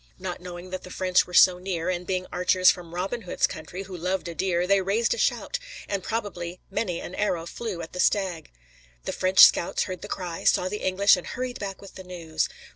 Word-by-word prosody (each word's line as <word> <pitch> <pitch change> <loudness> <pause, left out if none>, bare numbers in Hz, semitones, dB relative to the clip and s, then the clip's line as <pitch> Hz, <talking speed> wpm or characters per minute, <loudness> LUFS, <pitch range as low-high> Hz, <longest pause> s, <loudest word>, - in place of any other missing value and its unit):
Not 185 -1 -5
knowing 180 0 -8
that 185 0 -4
the - - -11
French 185 0 +2
were 180 - -12
so 180 0 +7
near, 180 -3 -3
and 180 -1 -2
being 185 -1 -1
archers 185 +1 +5
from 175 -2 -9
Robin 195 +7 -2
Hood's 180 - +1
country, 175 +3 -6
who 190 -1 -9
loved 180 +2 -2
a 170 - -5
deer, 180 0 0
they 195 +1 +3
raised 205 - +1
a - - -5
shout, - - 0 0.3
and 200 -1 -2
probably 180 -6 -4
many 185 -4 -1
an - - -8
arrow 180 -5 -1
flew 185 -1 -5
at 165 - -10
the 180 - -6
stag. 185 -5 +1 0.6
The - - -2
French 185 0 +4
scouts 170 - +6
heard 185 -3 -6
the - - -7
cry, 175 -4 -5
saw 180 - +3
the 210 - -3
English 195 +2 +4
and 180 - -7
hurried 250 -1 -4
back 195 -1 -6
with 195 - -12
the 190 - -9
news. 170 -3 -3
185 Hz, 220 wpm, -26 LUFS, 175-195 Hz, 0.6 s, so